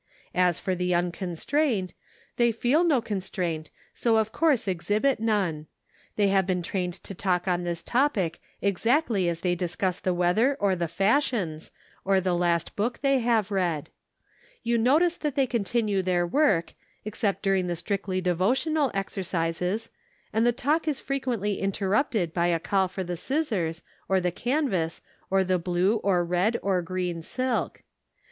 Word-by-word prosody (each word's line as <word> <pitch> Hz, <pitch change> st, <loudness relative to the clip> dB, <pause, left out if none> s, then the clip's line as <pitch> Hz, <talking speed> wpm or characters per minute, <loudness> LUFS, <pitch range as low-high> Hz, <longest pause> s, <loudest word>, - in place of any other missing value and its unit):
As 180 Hz, -2 st, +2 dB
for 185 Hz, -, -1 dB
the 180 Hz, 0 st, 0 dB
unconstraint, 185 Hz, -, -1 dB, 0.4 s
they 235 Hz, -1 st, +4 dB
feel 245 Hz, +8 st, +2 dB
no 300 Hz, -8 st, +3 dB
constraint, 180 Hz, -6 st, -3 dB, 0.2 s
so 230 Hz, -2 st, +2 dB
of 220 Hz, 0 st, +1 dB
course 295 Hz, -8 st, +2 dB
exhibit 205 Hz, +8 st, +1 dB
none; 190 Hz, -9 st, 0 dB, 0.5 s
they 205 Hz, -2 st, +3 dB
have 195 Hz, -1 st, +2 dB
been 180 Hz, -2 st, 0 dB
trained 180 Hz, -1 st, -2 dB
to -, -, -7 dB
talk 180 Hz, -1 st, -1 dB
on 180 Hz, -1 st, +1 dB
this 170 Hz, -1 st, -3 dB
topic 230 Hz, -, 0 dB, 0.2 s
exactly 210 Hz, -, +2 dB
as 165 Hz, -1 st, -3 dB
they 180 Hz, -1 st, +1 dB
discuss 180 Hz, +1 st, -2 dB
the 185 Hz, -, 0 dB
weather 180 Hz, +10 st, +2 dB
or 200 Hz, -2 st, +2 dB
the 170 Hz, -1 st, -1 dB
fashions, 195 Hz, -, 0 dB, 0.3 s
or 195 Hz, 0 st, +3 dB
the 185 Hz, -1 st, 0 dB
last 175 Hz, -1 st, 0 dB
book 235 Hz, +4 st, -1 dB
they 275 Hz, -1 st, +3 dB
have 230 Hz, -4 st, +1 dB
read. 175 Hz, -6 st, -1 dB, 0.7 s
You 235 Hz, 0 st, +1 dB
notice 315 Hz, +9 st, +3 dB
that 295 Hz, -4 st, -3 dB
they 275 Hz, -, +3 dB
continue 215 Hz, -3 st, 0 dB
their 180 Hz, -1 st, +1 dB
work, 195 Hz, -, +2 dB, 0.3 s
ex 215 Hz, 0 st, -6 dB
cept 200 Hz, -5 st, 0 dB
during 195 Hz, -2 st, +2 dB
the 175 Hz, -, -1 dB
strictly 185 Hz, +1 st, -2 dB
devotional 255 Hz, -, +1 dB
exercises, 185 Hz, +2 st, -2 dB, 0.4 s
and 225 Hz, +2 st, +3 dB
the -, -, +5 dB
talk 290 Hz, +6 st, 0 dB
is 290 Hz, -3 st, 0 dB
frequently 245 Hz, -7 st, -2 dB
interrupted 195 Hz, -, 0 dB
by 170 Hz, -1 st, +1 dB
a 170 Hz, -1 st, +1 dB
call 190 Hz, +2 st, +1 dB
for 190 Hz, +1 st, -5 dB
the 175 Hz, -1 st, -4 dB
scissors, 205 Hz, -, -1 dB, 0.3 s
or 190 Hz, 0 st, +3 dB
the 180 Hz, -1 st, 0 dB
canvas, 215 Hz, -, -1 dB, 0.3 s
or 195 Hz, 0 st, +3 dB
the 185 Hz, -1 st, +1 dB
blue, 180 Hz, +5 st, +1 dB
or 185 Hz, -4 st, +1 dB
red, 180 Hz, +7 st, +1 dB
or 190 Hz, -2 st, +1 dB
green 175 Hz, -1 st, -3 dB
silk. 255 Hz, +7 st, -2 dB
195 Hz, 160 wpm, -26 LUFS, 175-235 Hz, 0.7 s, the